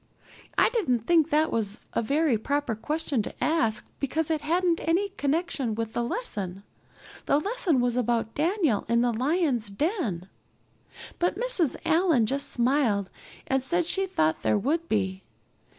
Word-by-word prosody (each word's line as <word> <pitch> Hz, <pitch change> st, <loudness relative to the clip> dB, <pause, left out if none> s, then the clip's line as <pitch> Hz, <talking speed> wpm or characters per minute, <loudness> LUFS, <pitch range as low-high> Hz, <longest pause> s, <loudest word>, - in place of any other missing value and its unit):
I -, -, +5 dB
didn't 285 Hz, -, +1 dB
think 325 Hz, -1 st, +4 dB
that 310 Hz, +2 st, +2 dB
was 215 Hz, -1 st, -2 dB
a -, -, +1 dB
very 285 Hz, +3 st, +2 dB
proper 280 Hz, +3 st, -1 dB
question 295 Hz, +2 st, -1 dB
to -, -, -6 dB
ask 225 Hz, -9 st, +1 dB
because 315 Hz, +3 st, -1 dB
it 310 Hz, -2 st, 0 dB
hadn't 340 Hz, +2 st, +1 dB
any 355 Hz, +5 st, +1 dB
connection 285 Hz, -, -1 dB
with 225 Hz, 0 st, -4 dB
the -, -, -1 dB
lesson 200 Hz, -, -4 dB, 0.6 s
the 280 Hz, -, +4 dB
lesson 380 Hz, -, +1 dB
was 245 Hz, -1 st, +1 dB
about 235 Hz, -2 st, 0 dB
Daniel 320 Hz, -, +1 dB
in 235 Hz, 0 st, +3 dB
the 240 Hz, -1 st, +1 dB
lions' 260 Hz, -, 0 dB
den 210 Hz, -, -2 dB, 0.9 s
but 350 Hz, +1 st, +1 dB
Mrs. 430 Hz, -, +1 dB
Allan 325 Hz, -7 st, +3 dB
just 280 Hz, +5 st, -1 dB
smiled 235 Hz, -6 st, +1 dB, 0.3 s
and 265 Hz, 0 st, +1 dB
said 345 Hz, +6 st, +1 dB
she 385 Hz, +3 st, 0 dB
thought 155 Hz, -, 0 dB
there -, -, +2 dB
would 320 Hz, +10 st, -1 dB
be. 190 Hz, -3 st, -1 dB
280 Hz, 150 wpm, -27 LUFS, 225-330 Hz, 0.9 s, I